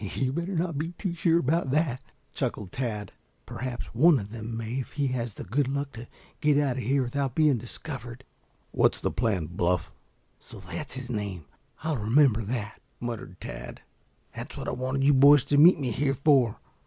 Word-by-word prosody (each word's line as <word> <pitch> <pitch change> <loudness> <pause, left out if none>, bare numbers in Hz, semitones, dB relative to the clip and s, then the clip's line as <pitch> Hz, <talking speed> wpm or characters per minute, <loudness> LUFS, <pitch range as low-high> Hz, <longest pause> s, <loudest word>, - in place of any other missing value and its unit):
"You'd 130 -1 0
better 170 +5 -2
not 165 -3 -1
be 165 +3 -3
too 180 0 -3
sure 165 -1 +3
about 165 -1 +1
that," 140 -2 +1 0.3
chuckled 100 -4 -3
Tad. 105 -6 -3 0.3
"Perhaps 125 -2 -5
one 150 +5 +6
of 100 -3 -6
them 115 0 -5
may 115 +3 -3
if 130 - -6
he 145 -1 0
has 120 -4 -3
the - - -7
good 130 +8 0
luck 140 +1 -2
to 115 +1 -9 0.3
get 150 -1 +3
out 140 -4 +1
of - - -2
here 135 +3 +2
without 135 +1 -2
being 150 -6 +4
discovered." 120 0 -8 0.5
"What's - - +2
the - - -1
plan, 100 -7 0
Bluff?" 90 +1 -1 0.5
"So - - -11
that's 90 +4 -6
his 130 -1 -6
name? 100 -7 -4 0.4
I'll 160 -3 0
remember 115 +1 +4
that," 110 -1 -4 0.2
muttered 115 -7 -6
Tad. - - -8 0.5
"That's - - -7
what - - -5
I - - 0
wanted 130 +2 -1
you 145 +1 +5
boys 140 0 +7
to 145 +1 +2
meet 170 +3 +8
me 130 -4 -1
here 135 +4 0
for. 135 -5 +3
130 Hz, 190 wpm, -27 LUFS, 115-145 Hz, 0.5 s, meet